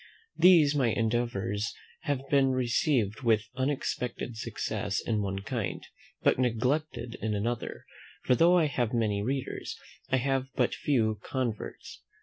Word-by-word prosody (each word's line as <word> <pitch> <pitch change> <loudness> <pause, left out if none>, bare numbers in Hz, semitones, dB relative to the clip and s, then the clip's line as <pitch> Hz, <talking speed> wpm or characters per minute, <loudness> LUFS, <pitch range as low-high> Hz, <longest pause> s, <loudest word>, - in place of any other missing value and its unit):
These 165 -6 +6
my 135 -4 +2
endeavours 115 -2 -1 0.3
have 140 -3 -1
been 135 -2 +3
received 120 -3 +1
with 110 -3 +2
unexpected 125 -3 -2
success 110 -3 -2
in 110 -2 -1
one 95 -1 -3
kind, 110 -6 -3 0.4
but - - +3
neglected 125 +1 0
in 110 -1 -1
another; 115 +3 -3 0.4
for - - +3
though 170 +7 +5
I 165 - +4
have 120 -5 -1
many 105 -3 +1
readers, 130 +4 -3 0.3
I 130 - +3
have 135 0 0
but - - +2
few 110 -7 +1
converts. 125 -5 -4
120 Hz, 135 wpm, -29 LUFS, 110-135 Hz, 0.4 s, These